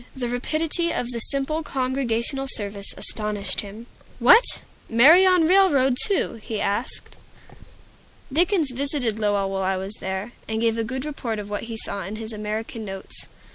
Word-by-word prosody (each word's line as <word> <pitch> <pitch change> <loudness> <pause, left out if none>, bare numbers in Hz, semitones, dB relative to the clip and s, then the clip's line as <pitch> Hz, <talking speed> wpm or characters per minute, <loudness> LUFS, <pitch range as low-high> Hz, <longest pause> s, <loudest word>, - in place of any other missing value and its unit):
The 245 -2 -3
rapidity 315 +7 0
of 245 0 -2
the 235 - -4
simple 275 +6 +1
Congregational 265 -1 -1
service 200 -3 -2
astonished 210 -2 -1
him. 210 +3 -10 0.3
"What? 475 +1 +5 0.3
Marry 310 +12 +7
on 365 -3 +4
railroad, 310 -9 +4
too?" 400 - 0
he 215 0 -4
asked. 205 +6 -2 1.2
Dickens 340 -2 +2
visited 250 -4 -1
Lowell 205 -2 0
while 195 0 -2
I 190 0 0
was 190 +2 0
there, 190 +4 -4 0.2
and 220 0 -2
gave 230 0 +1
a - - 0
good 260 +4 -4
report 255 -7 -4
of 205 0 -7
what 205 - -3
he 225 - -5
saw 200 -2 -4
in 195 +4 -6
his 220 0 -5
"American 215 +2 -5
Notes." 195 -2 -5
235 Hz, 160 wpm, -23 LUFS, 210-280 Hz, 1.2 s, Marry